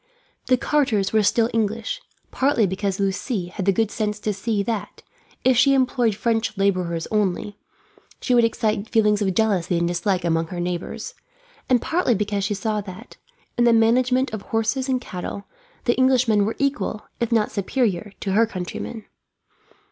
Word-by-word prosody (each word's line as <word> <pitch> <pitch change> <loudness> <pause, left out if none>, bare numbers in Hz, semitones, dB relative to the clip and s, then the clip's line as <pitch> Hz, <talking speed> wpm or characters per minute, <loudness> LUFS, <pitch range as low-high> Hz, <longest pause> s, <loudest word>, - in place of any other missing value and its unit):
The 255 - +4
carters 235 -10 +1
were 220 - +4
still 225 +3 +3
English; 225 - -1 0.3
partly 265 -5 +2
because 195 +1 -2
Lucie 195 0 -1
had 190 +1 -5
the - - +6
good 215 +2 0
sense 210 -1 -2
to 215 - -1
see 200 +1 -1
that, 225 -1 -4 0.4
if 260 0 +4
she 275 +3 +5
employed 250 -4 +2
French 225 -1 -1
labourers 180 -4 0
only, 205 -1 0 0.6
she 250 - 0
would 240 -1 +5
excite 220 -2 0
feelings 210 -2 +3
of 195 -2 +1
jealousy 185 -5 +1
and 170 0 +1
dislike 175 +1 0
among 165 -1 +1
her 175 +1 -6
neighbours; 175 0 -4 0.6
and 250 -2 +3
partly 320 -8 +1
because 205 0 -1
she 205 +1 -1
saw 215 +1 -1
that, 185 -2 -11 0.4
in - - +5
the 235 - +5
management 250 +3 +3
of 215 - -4
horses 225 +6 -1
and 255 -1 +1
cattle, 190 +1 -6 0.4
the 240 - +3
Englishmen 250 -5 +3
were 220 - -2
equal, 275 -6 -1
if 235 -1 -1
not 220 -2 +2
superior, 205 -2 -1
to 195 - -2
her 225 +4 +4
countrymen. 205 +3 -6
215 Hz, 165 wpm, -23 LUFS, 195-235 Hz, 0.6 s, the